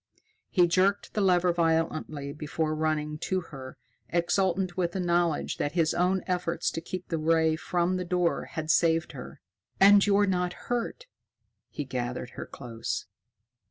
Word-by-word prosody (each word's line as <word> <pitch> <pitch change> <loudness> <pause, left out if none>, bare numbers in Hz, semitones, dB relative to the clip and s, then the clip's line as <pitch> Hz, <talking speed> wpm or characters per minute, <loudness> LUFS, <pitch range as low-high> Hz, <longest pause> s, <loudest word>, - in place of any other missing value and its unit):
He 180 -3 +4
jerked 190 +4 +1
the 210 - 0
lever 180 -2 +3
violently 160 -4 -1
before 155 +1 -2
running 155 -1 -1
to 185 +3 -1
her, 135 -6 -10 0.3
exultant 180 +1 +1
with 175 -2 -1
the 190 - -2
knowledge 175 -3 +1
that 145 - -2
his 165 -3 +2
own 180 +2 +1
efforts 180 -2 -1
to 165 - -4
keep 180 +2 -7
the 165 - -1
ray 160 0 +3
from 175 +2 0
the 180 - -2
door 180 -1 0
had 160 -1 -2
saved 165 -1 +2
her. 130 -3 -10 0.4
"And 200 +1 +7
you're 205 0 +4
not 180 -2 0
hurt!" 245 - -4 0.6
He 145 - -5
gathered 125 -1 -4
her - - -7
close. 115 -4 -5
170 Hz, 155 wpm, -28 LUFS, 155-185 Hz, 0.6 s, And